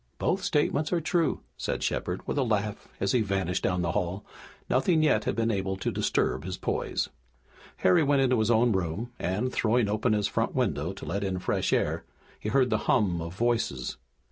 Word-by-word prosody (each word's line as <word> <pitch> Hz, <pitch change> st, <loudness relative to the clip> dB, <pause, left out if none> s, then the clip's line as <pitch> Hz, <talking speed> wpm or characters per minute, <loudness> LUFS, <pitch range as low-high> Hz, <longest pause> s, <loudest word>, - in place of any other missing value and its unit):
"Both 190 Hz, -, 0 dB
statements 155 Hz, -4 st, +1 dB
are 175 Hz, -, +2 dB
true," 165 Hz, +1 st, 0 dB, 0.2 s
said -, -, -2 dB
Shepard 90 Hz, +1 st, -2 dB
with -, -, -1 dB
a -, -, +3 dB
laugh 105 Hz, -3 st, -1 dB
as 100 Hz, -, +1 dB
he 125 Hz, -, +3 dB
vanished 95 Hz, -3 st, -1 dB
down 90 Hz, -1 st, 0 dB
the 85 Hz, -, 0 dB
hail. 90 Hz, +4 st, -2 dB, 0.4 s
Nothing 155 Hz, +5 st, +3 dB
yet 125 Hz, -9 st, +3 dB
had -, -, 0 dB
been 115 Hz, 0 st, +1 dB
able 95 Hz, -2 st, -1 dB
to -, -, -2 dB
disturb 65 Hz, -, 0 dB
his 90 Hz, +1 st, -4 dB
poise. -, -, -1 dB, 0.7 s
Harry 90 Hz, -, +4 dB
went 140 Hz, -2 st, +3 dB
into 125 Hz, -2 st, +3 dB
his 110 Hz, 0 st, +1 dB
own 120 Hz, +1 st, +4 dB
room, 95 Hz, +5 st, -2 dB
and, 105 Hz, +8 st, -1 dB
throwing 115 Hz, 0 st, +2 dB
open 110 Hz, +3 st, +1 dB
his 105 Hz, -1 st, +1 dB
front -, -, -1 dB
window 75 Hz, +5 st, 0 dB
to 95 Hz, -, -9 dB
let 100 Hz, +1 st, -2 dB
in 95 Hz, -1 st, -1 dB
fresh 90 Hz, -, -1 dB
air, -, -, +1 dB, 0.4 s
he 105 Hz, -, -3 dB
heard 125 Hz, +2 st, +3 dB
the -, -, +2 dB
hum 95 Hz, -9 st, +2 dB
of 85 Hz, +2 st, -6 dB
voices. 115 Hz, -, -1 dB
105 Hz, 195 wpm, -28 LUFS, 95-125 Hz, 0.7 s, Harry